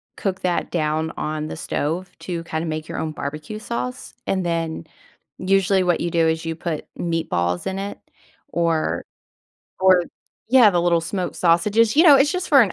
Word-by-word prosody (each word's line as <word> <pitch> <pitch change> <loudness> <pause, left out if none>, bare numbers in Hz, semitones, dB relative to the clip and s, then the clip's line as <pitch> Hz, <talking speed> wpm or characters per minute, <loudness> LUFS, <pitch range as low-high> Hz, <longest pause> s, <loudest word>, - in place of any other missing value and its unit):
cook 190 -2 -3
that 180 -1 -1
down 160 -1 0
on 155 0 -3
the - - -6
stove 165 +4 -2
to 170 -2 -4
kinda 160 0 -3
make 155 -1 -4
your - - -6
own 160 - -2
barbecue 150 +8 -6
sauce, 250 +3 -5
and 190 -1 0
then 165 -1 -2 0.5
usually 195 0 +2
what 175 -2 +1
you 170 - -1
do 165 -1 +3
is 160 +1 0
you 165 0 -2
put 165 -2 -4
meatballs 90 - -1
in 190 - -2
it, 200 +1 -5 0.5
or 165 - 0 0.8
or 185 -1 +6 0.5
Yeah, 245 -2 +7
the 175 -2 +1
little 170 -1 +3
smoked 180 +2 -3
sausages, 210 +7 +3
you 315 - +7
know, 315 -5 +9
it's 275 +2 +4
just 365 -1 -3
for 280 -3 +7
an 210 -6 +3
170 Hz, 180 wpm, -22 LUFS, 160-195 Hz, 0.8 s, know